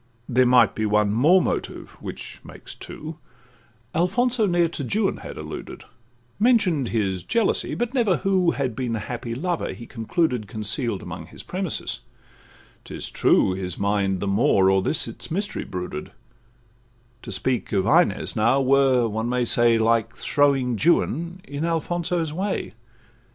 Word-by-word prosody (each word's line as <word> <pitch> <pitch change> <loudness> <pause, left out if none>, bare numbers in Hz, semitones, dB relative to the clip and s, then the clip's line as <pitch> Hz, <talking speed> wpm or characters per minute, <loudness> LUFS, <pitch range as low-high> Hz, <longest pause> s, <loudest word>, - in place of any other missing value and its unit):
There 125 0 +3
might 125 0 +5
be 110 -1 -1
one 105 0 +2
more 160 - +5
motive, - - -3
which - - -8
makes - - -11
two; 155 +1 -9 0.7
Alfonso 220 +6 +1
ne'er 175 -2 +3
to 155 -3 -5
Juan 200 - 0
had - - -9
alluded,— - - -8 0.6
Mention'd 205 - +3
his 95 -6 -1
jealousy 230 - 0
but 240 +1 -2
never 225 -9 +2
who 190 -3 +2
Had 135 -7 -2
been 120 -1 -2
the 115 - -1
happy 115 +1 -5
lover, 175 +5 -2
he 120 - -10
concluded, 120 - -1
Conceal'd 110 - -2
amongst - - -8
his - - -12
premises; 185 -3 -3 0.8
'tis - - -6
true, 95 - +3
His 90 -2 -4
mind 100 -2 0
the - - -1
more 100 -2 +3
o'er 95 0 +3
this 160 - +2
its - - -6
mystery 200 +5 -3
brooded; 90 -4 -6 1.1
To - - -8
speak 130 -2 -1
of 95 -2 +1
Inez - - +2
now 115 +5 +3
were, 135 -2 +3
one 110 +2 -2
may 125 0 +1
say, 120 0 +4
Like 115 0 +1
throwing 135 -5 +1
Juan 170 +1 +1
in 145 +2 -5
Alfonso's 165 0 -1
way. 190 +4 -3
130 Hz, 150 wpm, -23 LUFS, 110-175 Hz, 1.1 s, might